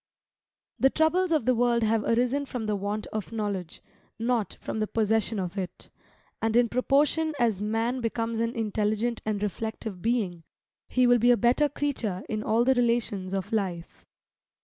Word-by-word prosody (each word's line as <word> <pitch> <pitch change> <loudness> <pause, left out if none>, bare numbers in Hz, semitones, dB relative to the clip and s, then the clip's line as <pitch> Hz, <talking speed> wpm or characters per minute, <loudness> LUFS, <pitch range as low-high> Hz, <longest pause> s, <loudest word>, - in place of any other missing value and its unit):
The 270 - +5
troubles 335 +5 +2
of 310 -8 +2
the 255 - +4
world 235 -1 +2
have 220 0 +2
arisen 250 +6 +1
from 245 -4 -4
the 210 -1 0
want 205 +2 -3
of 215 0 -4
knowledge, 205 -6 -4 0.3
not 230 -2 -1
from - - -4
the 215 - 0
possession 220 0 +1
of 185 +1 -3
it. 185 -2 -7 0.5
And 225 0 0
in 240 -1 +4
proportion 295 +5 +2
as 225 -6 +1
man 225 +4 -1
becomes 230 0 -2
an 230 +1 -1
intelligent 220 +1 -1
and 210 -1 -1
reflective 215 -2 -4
being, 210 -7 0 0.5
he 255 0 +3
will 245 0 +5
be 240 +2 +4
a 245 - +6
better 250 +6 +3
creature 250 -10 -2
in 215 -1 -2
all 225 +2 +2
the 265 - +5
relations 235 -6 0
of 195 +2 -3
life. 180 -5 -3
225 Hz, 170 wpm, -27 LUFS, 210-245 Hz, 0.5 s, a